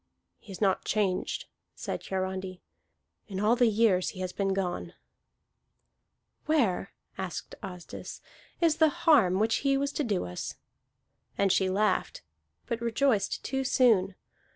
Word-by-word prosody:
"He 205 - -13
is 190 - -9
not 195 -2 +2
changed," 200 -4 -1 0.3
said - - -4
Hiarandi, 190 -1 -4 0.6
"in 190 -2 -5
all 215 +4 +4
the 245 -1 +4
years 210 -4 +3
he - - -9
has 185 -1 -3
been 195 -1 0
gone." 190 -2 -2 1.5
"Where," 230 - +1 0.3
asked 190 -3 -5
Asdis, 180 -2 -8 0.4
"is 330 -3 +3
the 315 -1 +5 0.2
harm 225 - +5
which 225 +2 +2
he 275 -1 +2
was 280 +1 -1
to 295 - -2
do 205 -7 -1
us?" 90 0 -5 0.8
And 195 -1 +3
she 190 0 +2
laughed, 195 - 0 0.4
but 235 0 -3
rejoiced 235 -3 +1
too 265 0 -1
soon. 220 -8 +3
200 Hz, 135 wpm, -29 LUFS, 185-240 Hz, 1.5 s, the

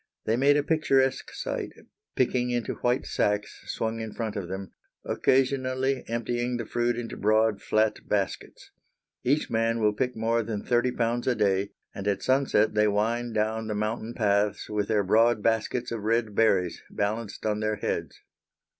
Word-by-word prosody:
They 110 - +2
made 140 +4 +4
a 145 - +1
picturesque 135 -4 +1
sight, - - -4 0.4
picking 125 -1 +1
into 120 -2 -1
white 125 +2 0
sacks 105 0 -1
swung 115 0 -2
in 110 -1 -5
front 110 -2 -3
of 100 -4 -4
them, 95 +1 -6 0.3
occasionally 130 0 +1
emptying 120 +1 -1
the 115 - -4
fruit 120 +1 0
into 120 -1 -5
broad, 110 -1 +2
flat 110 0 +1
baskets. 100 -2 -3 0.5
Each 140 +5 +1
man 115 0 +1
will 105 -1 +3
pick 125 +3 -2
more 115 +1 +1
than 110 -2 -4
thirty 120 +1 +2
pounds 120 +1 -1
a 125 - +3
day, 100 -2 +1 0.2
and 100 0 -5
at 100 -1 0
sunset 130 -5 +2
they 105 0 +3
wind 115 +3 0
down 110 +1 0
the 105 - -2
mountain 110 +2 -3
paths 105 -1 +1
with 105 -1 0
their 105 -2 +2
broad 110 +2 +3
baskets 115 +2 0
of 115 -2 -3
red 110 0 0
berries 95 -6 +2
balanced 105 +1 -3
on 105 -1 0
their 110 0 0
heads. - - -4
115 Hz, 165 wpm, -27 LUFS, 105-120 Hz, 0.5 s, made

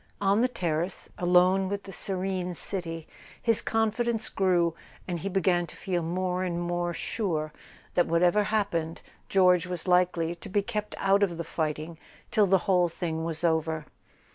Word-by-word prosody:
On 200 +2 +3
the 250 - +4
terrace, 175 -5 -2
alone 180 +2 +4
with 200 0 -3
the 195 - -9
serene 185 -2 -2
city, 165 -3 -5 0.3
his 230 -2 +2
confidence 225 +1 0
grew, 175 -3 +2 0.3
and 175 -2 -2
he 195 - -3
began 180 -2 +2
to - - -12
feel 180 -2 -2
more 180 +2 -1
and 175 -2 -2
more 175 0 -1
sure 160 -5 -2 0.4
that, 175 - +3
whatever 175 +5 +3
happened, 175 -7 -1 0.3
George 180 -2 +4
was 180 0 -4
likely 180 -2 +2
to 175 +4 -11
be 200 +1 +1
kept 210 -1 -4
out 195 +1 +3
of 180 -5 +1
the 170 - -3
fighting 155 0 -3 0.3
till 210 -3 +4
the 190 +1 +5
whole 180 -3 +3
thing 160 -1 -3
was 165 0 -3
over. 160 -2 +1
180 Hz, 165 wpm, -28 LUFS, 170-195 Hz, 0.4 s, the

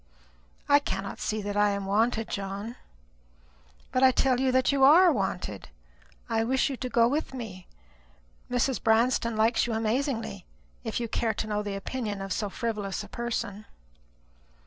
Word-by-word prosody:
"I 285 0 +6
cannot 200 -8 -4
see 215 -1 -2
that 205 0 -3
I 205 0 +4
am 200 -1 -2
wanted, 225 +3 +1
John." 200 +4 -5 1.2
"But 255 - +1
I 265 - +8
tell 255 0 +2
you 260 0 +2
that 260 +1 +3
you 275 -1 +2
are 335 +6 +8
wanted. 185 - -3 0.6
I 225 0 +1
wish 265 +4 +1
you 265 - -4
to 255 - -4
go 235 -1 +4
with 285 +1 -2
me. 205 -7 -8 0.8
Mrs. 245 -1 0
Branston 230 +1 +2
likes 225 +2 +3
you 235 - -2
amazingly, 225 - -2 0.4
if - - -2
you 235 - -2
care 225 0 -1
to - - -2
know 210 -1 -1
the 205 -1 -4
opinion 210 0 -4
of 195 -1 -3
so 205 - -2
frivolous 210 -3 -3
a - - -12
person." 220 -3 -4
225 Hz, 165 wpm, -28 LUFS, 205-255 Hz, 1.2 s, I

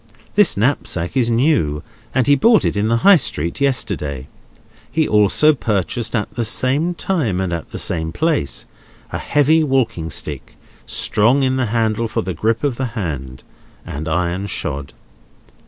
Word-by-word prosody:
This 205 - +3
knapsack 100 -6 -1
is 125 -3 +2
new, 115 - +1 0.3
and 130 -2 +1
he 145 - +5
bought 215 - +4
it - - 0
in 100 +1 0
the 115 +1 +2
High 200 -2 +9
Street 85 - -2
yesterday. 75 - -1 0.7
He 160 -1 +1
also 105 +9 +4
purchased, 115 -1 -2
at 105 - -2
the 120 - -2
same 135 +9 0
time 145 - -1
and 95 -2 -2
at 85 -2 -5
the - - -7
same 80 -1 -2
place, 145 - -1 0.5
a - - -3
heavy 150 +2 +3
walking 120 - 0
stick; 75 -2 -4 0.3
strong 120 +7 +2
in 130 0 +1
the 130 -2 0
handle 115 0 0
for 115 - -2
the 95 +1 -3
grip 110 - -1
of 135 -5 0
the 130 - -1
hand, 65 - -5 0.4
and 75 +3 -6
iron 90 +4 -1
shod. 70 -6 -4
115 Hz, 160 wpm, -19 LUFS, 85-135 Hz, 0.7 s, High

